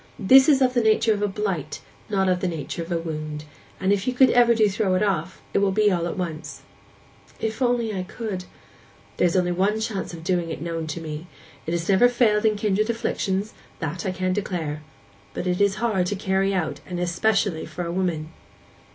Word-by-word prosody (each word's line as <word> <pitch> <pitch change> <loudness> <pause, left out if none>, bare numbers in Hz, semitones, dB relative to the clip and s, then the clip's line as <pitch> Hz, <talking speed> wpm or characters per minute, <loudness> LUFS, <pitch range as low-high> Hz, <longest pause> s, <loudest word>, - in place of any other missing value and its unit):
This 265 +8 +6
is 275 -3 +5
of 250 -1 +2
the 245 - +3
nature 220 0 +3
of 205 - -3
a 205 - +2
blight, 190 -7 -3 0.3
not 195 -2 +1
of 180 -1 +2
the 185 - -1
nature 165 -1 -4
of 165 +2 -7
a 170 - +1
wound; 155 -2 -5 0.3
and 190 +1 +2
if 200 +2 -2
you 250 0 -1
ever 245 -2 +6
do 220 -1 +4
throw 195 -2 0
it 185 - +2
off; 185 -3 -2
it - - +3
will 200 -1 +2
be 210 +1 +3
all 170 -2 0
at 175 - -5
once.' 160 -4 -5 0.8
'If 220 +3 -3
I - - +4
only 225 -6 -1
could!' 195 -3 -5 0.7
'There 180 - +4
is 170 - -1
only 180 -1 +2
one 195 +5 +1
chance 220 -3 -3
of 165 -2 -9
doing 175 -1 0
it 160 - -5
known 165 -1 -4
to 155 +2 -5
me. 155 +1 -6 0.4
It - - -1
has 170 -1 -2
never 200 +5 +5
failed 225 -3 +2
in 215 -1 +3
kindred 210 +1 0
afflictions,—that 195 -7 -3
I - - -1
can 185 0 -1
declare. 170 -7 -3 0.5
But - - -3
it 180 +1 0
is 200 -1 +3
hard 215 -5 0
to 205 - -1
carry 195 0 0
out, 160 -6 -2
and 180 -1 -4
especially 180 0 0
for 175 - -5
a 170 - -3
woman. 170 -4 -1
190 Hz, 210 wpm, -24 LUFS, 170-215 Hz, 0.8 s, This